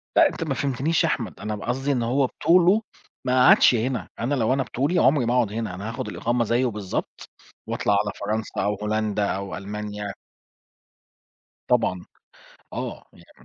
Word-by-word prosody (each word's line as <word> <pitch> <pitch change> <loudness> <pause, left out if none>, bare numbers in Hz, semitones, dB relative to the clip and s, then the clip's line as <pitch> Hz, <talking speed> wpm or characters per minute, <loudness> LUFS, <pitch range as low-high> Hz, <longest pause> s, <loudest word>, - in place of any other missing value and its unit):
لأ، 330 - +7
أنت 165 - -5
ما 150 -4 -1
فهمتنيش 140 +4 0
يا - - +2
أحمد. 110 - -3
أنا 105 +1 -3
ب 105 - -9
قصدي 135 +4 -1
إن 125 -4 0
هو 130 +3 +2
بِطولُه، 180 - +4 0.4
ما 125 0 +4
قعدش - - +7
هنا. 125 +3 -1
أنا 140 +5 0
لو 120 0 +2
أنا 135 -1 +1
بِطولي، 145 +9 0
عمري 135 -1 +4
ما 120 - +1
أقعد 120 -5 +2
هنا، 110 -5 -3
أنا 100 +4 -5
هاخد 115 - -5
الإقامة 120 +1 0
زيّه 120 +3 +1
بالضبط، 105 -5 -4 0.4
وأطلع 105 - 0
على 105 0 +1
فرنسا 110 +2 -2
أو 105 +1 0
هولندا 105 -1 0
أو 100 -1 -3
ألمانيا. 105 0 -5 1.5
طبعًا. 110 -7 +1 0.7
آه - - -5
يعني - - -20
115 Hz, 170 wpm, -24 LUFS, 105-130 Hz, 1.5 s, لأ